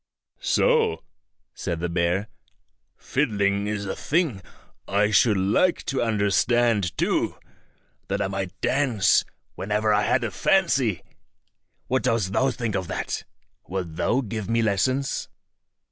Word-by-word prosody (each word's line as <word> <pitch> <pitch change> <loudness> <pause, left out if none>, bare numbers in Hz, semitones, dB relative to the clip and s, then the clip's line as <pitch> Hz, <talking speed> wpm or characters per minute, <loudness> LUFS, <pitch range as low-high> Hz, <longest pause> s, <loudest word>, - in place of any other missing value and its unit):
"So," 465 -3 +2 0.5
said 85 -3 -4
the 85 - -1
bear; 85 +4 0 0.7
"fiddling 100 -7 0
is 105 -1 -3
a 95 - -3
thing 150 - 0 0.5
I 105 +2 +2
should 105 0 +4
like 105 - +2
to 135 - -1
understand 105 -1 +1
too, - - 0 0.7
that 100 +1 -1
I 100 - 0
might 95 -1 -5
dance 125 -9 +3 0.3
whenever 105 +1 0
I 105 - +3
had 105 - +1
a 115 - -2
fancy. 130 - +2 0.8
What 130 +1 0
dost 115 -6 0
thou 135 +5 +3
think 120 -3 -3
of 95 -3 -2
that? - - -4 0.4
Wilt 90 -3 -4
thou 120 +9 +1
give 110 -3 -5
me 115 0 +2
lessons?" 130 +7 0
105 Hz, 130 wpm, -24 LUFS, 95-125 Hz, 0.8 s, should